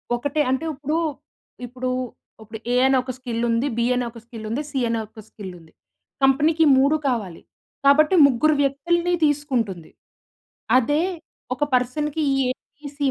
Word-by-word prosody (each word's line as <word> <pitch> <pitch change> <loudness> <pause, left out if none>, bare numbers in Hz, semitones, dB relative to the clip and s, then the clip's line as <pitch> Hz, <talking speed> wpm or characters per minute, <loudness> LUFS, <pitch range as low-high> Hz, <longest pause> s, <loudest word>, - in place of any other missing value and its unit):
ఒకటే. 285 +5 -1
అంటే 265 +4 -1
ఇప్పుడు, 295 +3 -2 0.7
ఇప్పుడు, 255 +1 -4 0.5
ఇప్పుడు 220 0 -9
ఏ - - +2
అనే 265 0 +3
ఒక 255 - -4
స్కిల్ 240 -3 -4
ఉంది. 230 +4 +1
బి 235 - +1
అనే 245 -1 -1
ఒక 230 - -12
స్కిల్ 230 -2 -9
ఉంది. 240 +6 -2
సి 270 - -1
అనే 230 - 0
ఒక 220 +1 -13
స్కిల్ 195 -4 -9
ఉంది. 160 -1 -19 0.5
కంపెనీకి 305 +4 +4
3 280 +4 +4
కావాలి. 210 -10 -2 0.4
కాబట్టి 305 +5 +5
ముగ్గురు 285 +4 +2
వ్యక్తుల్ని 340 +6 0
తీసుకుంటుంది. 250 - -1 0.9
అదే 290 +5 +2 0.5
ఒక 255 - -2
పర్సన్‌కి 290 +5 0 0.2
ఏ - - 0 0.3
బి 295 - -8
సి 290 - -3
265 Hz, 150 wpm, -22 LUFS, 230-295 Hz, 0.9 s, కాబట్టి